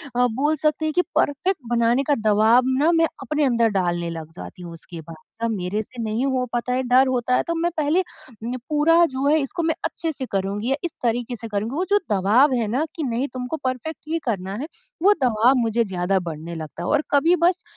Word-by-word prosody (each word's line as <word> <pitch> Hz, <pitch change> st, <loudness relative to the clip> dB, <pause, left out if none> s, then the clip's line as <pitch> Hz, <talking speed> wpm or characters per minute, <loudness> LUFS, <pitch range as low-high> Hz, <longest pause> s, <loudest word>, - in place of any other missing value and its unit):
अ, 245 Hz, 0 st, +4 dB
बोल 280 Hz, +7 st, 0 dB
सकते 305 Hz, +1 st, +1 dB
हैं 310 Hz, -, -1 dB
कि 360 Hz, -, +3 dB
परफेक्ट 345 Hz, +6 st, +1 dB
बनाने 240 Hz, +2 st, +2 dB
का 290 Hz, +1 st, +2 dB
दबाव 220 Hz, +4 st, +5 dB, 0.2 s
ना 315 Hz, +4 st, +4 dB
मैं 330 Hz, -1 st, +4 dB, 0.2 s
अपने 295 Hz, +3 st, -1 dB
अंदर 235 Hz, -3 st, +3 dB
डालने 175 Hz, -2 st, -1 dB
लग 160 Hz, -1 st, -7 dB
जाती 180 Hz, -, -10 dB
हूँ 170 Hz, -1 st, -8 dB
उसके 165 Hz, 0 st, -10 dB
बाद। 165 Hz, +1 st, -11 dB, 0.3 s
अब 230 Hz, -, +1 dB
मेरे 200 Hz, 0 st, -2 dB
से 240 Hz, +2 st, -9 dB
नहीं 220 Hz, +4 st, -1 dB
हो 260 Hz, -2 st, 0 dB
पाता 240 Hz, +1 st, -1 dB
है, 255 Hz, -, +1 dB
डर 255 Hz, +2 st, +4 dB
होता 250 Hz, -1 st, +1 dB
है -, -, +2 dB
तो 335 Hz, -, 0 dB
मैं 335 Hz, +1 st, +1 dB
पहले 310 Hz, +5 st, +2 dB, 0.4 s
नि 245 Hz, +2 st, -3 dB
पूरा 325 Hz, +3 st, +4 dB
जो 270 Hz, -3 st, -3 dB
है 305 Hz, +2 st, +4 dB
इसको 330 Hz, +5 st, -3 dB
मैं 320 Hz, -1 st, +1 dB
अच्छे 330 Hz, -1 st, -2 dB
से 265 Hz, -, -5 dB
करुँगी 200 Hz, +4 st, -2 dB
या -, -, +3 dB
इस 345 Hz, -, -2 dB
तरीके 240 Hz, +1 st, -1 dB
से 230 Hz, 0 st, -8 dB
करुँगी, 215 Hz, +4 st, -3 dB
वो 360 Hz, +4 st, 0 dB
जो 410 Hz, -, +5 dB
दबाव 215 Hz, +8 st, +4 dB
है 230 Hz, -3 st, 0 dB
ना 250 Hz, +8 st, 0 dB
कि 320 Hz, -, -3 dB
नहीं 250 Hz, +1 st, -1 dB
तुमको 255 Hz, +4 st, -4 dB
परफेक्ट 255 Hz, +5 st, -3 dB
ही 330 Hz, +1 st, 0 dB
करना 195 Hz, -5 st, -2 dB
है, 300 Hz, -, -4 dB, 0.4 s
वो 405 Hz, +2 st, +7 dB
दबाव 240 Hz, +1 st, +4 dB
मुझे 230 Hz, -1 st, +1 dB
ज़्यादा 190 Hz, 0 st, 0 dB
बढ़ने 170 Hz, -1 st, -6 dB
लगता 160 Hz, +1 st, -7 dB
है। -, -, -2 dB
और 300 Hz, 0 st, +2 dB
कभी 305 Hz, +5 st, +4 dB
बस 365 Hz, +1 st, +2 dB
250 Hz, 230 wpm, -22 LUFS, 210-295 Hz, 0.4 s, वो